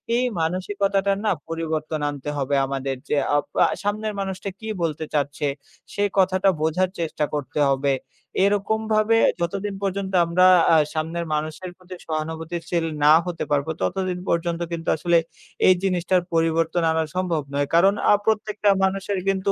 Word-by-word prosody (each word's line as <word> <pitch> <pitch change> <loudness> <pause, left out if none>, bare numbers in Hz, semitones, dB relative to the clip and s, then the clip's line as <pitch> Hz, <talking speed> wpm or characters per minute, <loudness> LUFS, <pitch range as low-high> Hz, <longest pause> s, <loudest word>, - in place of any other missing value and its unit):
এই 245 - +2 0.2
মানসিকতাটার 195 +3 0
না 210 - +3 0.2
পরিবর্তন 160 -1 -3
আনতে 145 0 -6
হবে 140 0 0
আমাদের 135 0 -3
যে 150 - +1 0.2
আ - - +4 0.2
পা - - +5 0.2
সামনের 210 +1 -2
মানুষটা 195 0 -4
কি 220 - -8 0.2
বলতে 160 -1 -2
চাচ্ছে? 145 0 -1 0.5
সেই 205 0 +1
কথাটা 190 +1 +3
বোঝার 170 +4 +1
চেষ্টা 155 -2 -1
করতে 145 0 -3
হবে। 135 0 +1 0.5
এরকম 205 +2 +1
ভাবে 215 +1 +3 0.2
যতদিন 195 +4 -2
পর্যন্ত 195 0 -2
আমরা 180 +2 +3 0.3
আ - - +7 0.2
সামনের 165 +2 -2
মানুষের 155 +4 -3
প্রতি 185 0 -11
সহানুভূতিশীল 160 +1 -3 0.2
না 150 - +8
হতে 175 -2 -3
পারবো 145 +1 +1
ততদিন 185 -1 -1
পর্যন্ত 170 0 0
কিন্তু 165 -1 -3
আসলে 170 +2 +3 0.5
এই 185 - +8
জিনিসটার 185 -1 +1
পরিবর্তন 165 +1 +1
আনা 160 0 +1
সম্ভব 180 -4 0
নয়। 140 0 0
কারন 190 +4 +5 0.2
আ - - +7
প্রত্যেকটা 210 -2 +1
মানুষের 195 0 0
কিন্তু 195 0 +1
175 Hz, 150 wpm, -23 LUFS, 155-195 Hz, 0.5 s, না